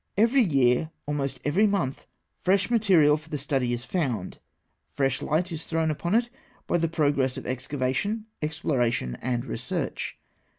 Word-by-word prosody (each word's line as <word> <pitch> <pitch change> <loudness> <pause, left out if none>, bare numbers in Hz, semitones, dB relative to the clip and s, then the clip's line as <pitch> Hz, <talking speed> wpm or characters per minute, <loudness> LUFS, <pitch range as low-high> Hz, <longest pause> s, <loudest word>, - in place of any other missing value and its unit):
Every 235 +6 +5
year, 140 - +3 0.2
almost 140 -3 -2
every 185 +9 +4
month, 180 -10 -1 0.3
fresh 190 +4 +2
material 180 -10 +5
for 155 +1 -15
the 150 - -2
study 135 -3 0
is 120 +1 -3
found, 130 - -2 0.5
fresh 135 -2 0
light 175 +4 0
is 160 -1 -6
thrown 160 -1 +1
upon 170 +6 -1
it 240 +1 +2 0.3
by 175 - +1
the 165 - +2
progress 145 -5 +1
of - - -7
excavation, 135 - -2 0.2
exploration, 120 - 0
and 125 0 -1
research. 125 -1 -3
150 Hz, 145 wpm, -26 LUFS, 130-180 Hz, 0.5 s, Every